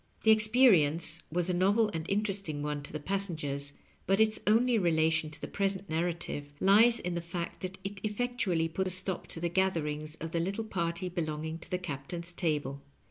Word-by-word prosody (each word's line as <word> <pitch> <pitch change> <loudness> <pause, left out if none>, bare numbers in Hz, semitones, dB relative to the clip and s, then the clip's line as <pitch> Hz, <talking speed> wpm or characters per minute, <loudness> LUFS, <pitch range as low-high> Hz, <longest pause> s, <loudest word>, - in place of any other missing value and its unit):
The 220 - +7
experience 190 - +4
was 175 +1 0
a 180 - +1
novel 205 +5 +3
and 160 0 -4
interesting 195 -7 -1
one 150 -1 -2
to 145 - -8
the 155 - -4
passengers, 150 -6 -2 0.3
bnt 195 +1 +3
its 220 0 +3
only 230 +2 +4
relation 160 -3 +2
to 155 - -12
the - - -5
present 195 -2 -2
narrative 160 -3 -2
lies 225 +5 +6
in 180 - -3
the 170 - -2
fact 170 0 -5
that 185 0 -5
it 195 0 -6
effectually 210 -6 0
pat 185 +4 -2
a - - 0
stop 185 0 -3
to - - -6
the 170 - 0
gatherings 155 -4 -1
of 165 0 -6
the 170 - 0
little 195 +6 -1
party 170 -3 -2
belonging 160 -2 -3
to - - -11
the 180 - 0
Captain's 170 +1 -5
table. 145 -6 -1
175 Hz, 190 wpm, -31 LUFS, 160-195 Hz, 0.3 s, The